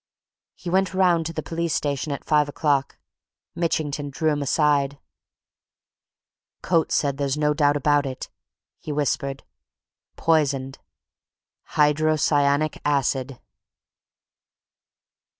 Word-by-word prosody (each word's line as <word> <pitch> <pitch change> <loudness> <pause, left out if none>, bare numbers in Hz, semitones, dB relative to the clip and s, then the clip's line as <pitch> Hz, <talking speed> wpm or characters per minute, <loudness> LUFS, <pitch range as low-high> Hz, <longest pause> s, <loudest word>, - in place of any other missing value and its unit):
He - - -12
went 190 0 +1
round 175 -4 +3
to 165 - -6
the 155 - -4
police 170 -1 -2
station 145 0 -2
at 140 - -5
five 150 -2 +2
o'clock. 145 -2 0 0.6
Mitchington 155 -4 -2
drew 155 +3 0
him 145 -1 -1
aside. 145 -1 +1 1.7
"Coates 165 -2 +1
says 140 -2 +1
there's 140 0 -1
no 150 0 +2
doubt 145 -1 +2
about 145 0 +2
it!" 130 -1 -6 0.5
he 155 - -6
whispered. 140 -2 -2 0.7
"Poisoned! 140 -5 0 1.0
Hydrocyanic 150 -1 +2
acid!" 135 -2 0
145 Hz, 100 wpm, -23 LUFS, 140-155 Hz, 1.7 s, round